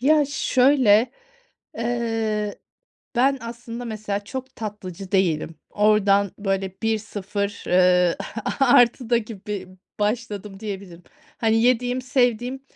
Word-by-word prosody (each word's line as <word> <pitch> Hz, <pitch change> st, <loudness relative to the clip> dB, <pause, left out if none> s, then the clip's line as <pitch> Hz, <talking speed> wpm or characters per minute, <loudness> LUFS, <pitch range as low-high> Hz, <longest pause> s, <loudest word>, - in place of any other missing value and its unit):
Ya 295 Hz, +3 st, +4 dB
şöyle, 255 Hz, -4 st, +3 dB, 0.7 s
eee, 225 Hz, -3 st, -1 dB, 0.6 s
ben 270 Hz, +2 st, +3 dB
aslında 235 Hz, +1 st, -7 dB
mesela 210 Hz, -2 st, -4 dB
çok 260 Hz, +3 st, -7 dB
tatlıcı 195 Hz, -3 st, -7 dB
değilim. 165 Hz, -4 st, +1 dB, 0.2 s
Oradan 200 Hz, -2 st, +3 dB
böyle 195 Hz, -1 st, -1 dB
1-0, 205 Hz, -2 st, -2 dB
ııı, 180 Hz, -1 st, +4 dB, 0.3 s
a-artı 245 Hz, -2 st, +3 dB
da 235 Hz, -, +5 dB
gibi 210 Hz, -4 st, -6 dB, 0.3 s
başladım 210 Hz, -2 st, -2 dB
diyebilirim. 190 Hz, -5 st, -7 dB, 0.4 s
Hani, 225 Hz, 0 st, +2 dB
yediğim, 250 Hz, +1 st, +2 dB
sevdiğim 250 Hz, 0 st, 0 dB
215 Hz, 100 wpm, -23 LUFS, 200-245 Hz, 0.7 s, da